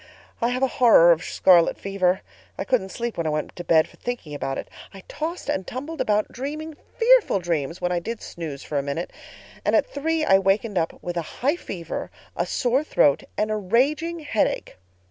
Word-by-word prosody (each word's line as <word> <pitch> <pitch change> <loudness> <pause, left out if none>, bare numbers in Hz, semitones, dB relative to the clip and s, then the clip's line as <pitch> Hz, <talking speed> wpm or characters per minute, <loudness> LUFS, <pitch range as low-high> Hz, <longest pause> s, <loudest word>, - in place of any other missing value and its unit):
I 235 - +3
have 255 +2 -1
a - - +5
horror 175 -8 +8
of 165 -1 +2
scarlet 175 -3 +4
fever. 190 -1 0 0.4
I - - -2
couldn't 230 -7 0
sleep 235 +3 -4
when 165 - 0
I - - +1
went 150 0 -3
to 175 - -6
bed 160 -2 +4
for - - -20
thinking 240 -12 -5
of 145 - -7 0.2
it. - - -5 0.3
I 190 - -11
tossed 330 +3 -5
and 190 -1 -2
tumbled 290 +6 -5
about, 210 0 +1
dreaming 300 +4 -5 0.2
fearful 480 - +5
dreams 165 -3 -2
when 180 - 0
I 175 - +1
did 225 +6 -5
snooze 155 -5 -7
for 145 - -2
a - - 0
minute; 140 +5 -4 0.5
and - - +2
at - - +4
three 320 - -1
I 195 -6 +5
wakened 195 +1 +1
up 165 - -2
with 175 0 -4
a - - +1 0.2
high 290 +4 +4
fever, 170 - -6 0.3
a - - -1
sore 255 +4 +1
throat, 145 - +3 0.2
and 215 0 0
a - - +1
raging 290 - +1
headache. 255 -8 -1
205 Hz, 205 wpm, -24 LUFS, 170-275 Hz, 0.5 s, horror